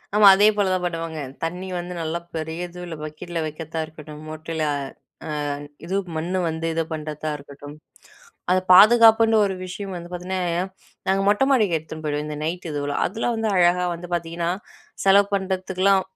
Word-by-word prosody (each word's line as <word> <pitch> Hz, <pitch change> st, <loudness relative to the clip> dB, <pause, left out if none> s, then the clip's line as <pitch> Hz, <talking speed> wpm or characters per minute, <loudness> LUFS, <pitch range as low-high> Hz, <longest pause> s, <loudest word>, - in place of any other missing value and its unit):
ஆமா, 210 Hz, -1 st, +8 dB
அதே 205 Hz, +2 st, +5 dB
போல 200 Hz, -2 st, +2 dB
தான் 185 Hz, -, -1 dB
பண்ணுவாங்க. 165 Hz, -2 st, -3 dB, 0.2 s
தண்ணி 180 Hz, +3 st, -3 dB
வந்து 175 Hz, +1 st, -6 dB
நல்லா 165 Hz, +1 st, -2 dB, 0.2 s
பெரியதுல 170 Hz, +2 st, -5 dB
பக்கெட்ல 165 Hz, +3 st, -5 dB
வைக்க 155 Hz, +1 st, -7 dB
தான் 160 Hz, -, 0 dB
இருக்கட்டும், 155 Hz, -1 st, -11 dB
மொட்ல 160 Hz, 0 st, -4 dB, 0.6 s
அ -, -, -5 dB, 0.6 s
இது 185 Hz, -, -2 dB, 0.2 s
மண்ணு 175 Hz, +4 st, -1 dB
வந்து 160 Hz, +1 st, -4 dB
இத 165 Hz, -, 0 dB
பண்றதா 155 Hz, 0 st, -4 dB
இருக்கட்டும், 145 Hz, +1 st, -11 dB, 0.8 s
அத 185 Hz, -, +5 dB, 0.2 s
பாதுகாப்புன்னு 225 Hz, +2 st, +7 dB
ஒரு 190 Hz, -1 st, -2 dB
விஷயம் 190 Hz, +1 st, -6 dB
வந்து 175 Hz, 0 st, -8 dB
பாத்தீங்னா, 180 Hz, +1 st, -3 dB, 0.7 s
நாங்க 195 Hz, +1 st, +2 dB
மொட்ட 210 Hz, +6 st, +3 dB
மாடிக்கு 210 Hz, -10 st, +3 dB
எடுத்துன் 160 Hz, 0 st, -9 dB
போயிடுவோம். 150 Hz, 0 st, -1 dB
இந்த 150 Hz, -1 st, -5 dB
நைட் 175 Hz, +2 st, -3 dB
இதுலாம் 145 Hz, -1 st, -1 dB
அதலாம் 230 Hz, +3 st, -1 dB
வந்து 220 Hz, -1 st, -1 dB
அழகா 180 Hz, 0 st, +4 dB
வந்து 175 Hz, +1 st, -9 dB
பாத்தீங்கன்னா, 170 Hz, 0 st, -2 dB, 0.6 s
செலவு 200 Hz, +1 st, +6 dB
பண்றதுக்குலாம் 190 Hz, 0 st, +1 dB
175 Hz, 155 wpm, -23 LUFS, 160-190 Hz, 0.8 s, ஆமா